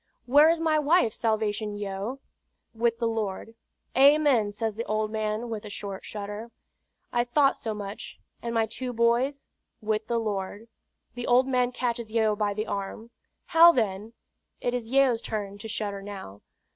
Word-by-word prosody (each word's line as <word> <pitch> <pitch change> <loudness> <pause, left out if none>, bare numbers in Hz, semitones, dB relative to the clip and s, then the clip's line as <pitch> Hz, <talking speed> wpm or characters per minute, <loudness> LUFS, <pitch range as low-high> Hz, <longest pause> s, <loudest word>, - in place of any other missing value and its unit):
"Where 290 +5 +6
is 330 0 +2
my 315 -2 +2
wife, 300 -6 +3
Salvation 215 -2 -1
Yeo?" 205 +5 -4 0.6
"With 230 0 +1
the 230 -1 0
Lord." 220 -1 -3 0.4
"Amen!" 275 -5 +5
says 220 +1 -2
the 225 +3 -4
old 215 0 -1
man, 215 +1 -2
with 220 -3 -5
a 210 - -8
short 200 -1 -6
shudder. 210 +2 -6 0.6
"I 240 - +3
thought 275 +3 +3
so 220 -2 -4
much; 205 0 -7 0.2
and 235 - -3
my 225 -1 +3
two 245 +3 -5
boys?" 240 +5 +1 0.3
"With 215 0 -2
the 235 - 0
Lord." 205 0 -3 0.5
The 245 0 -5
old 250 +2 +4
man 250 -2 +1
catches 235 -3 -3
Yeo 220 -2 +2
by 205 -1 -1
the 215 +1 -2
arm. 200 +3 -5 0.3
"How, 335 0 +8
then?" 215 - -2 0.5
It 245 - -1
is 240 -2 -3
Yeo's 260 -3 +3
turn 205 -2 -4
to 220 - -7
shudder 205 -2 -3
now. 195 - -9
225 Hz, 165 wpm, -27 LUFS, 210-245 Hz, 0.6 s, How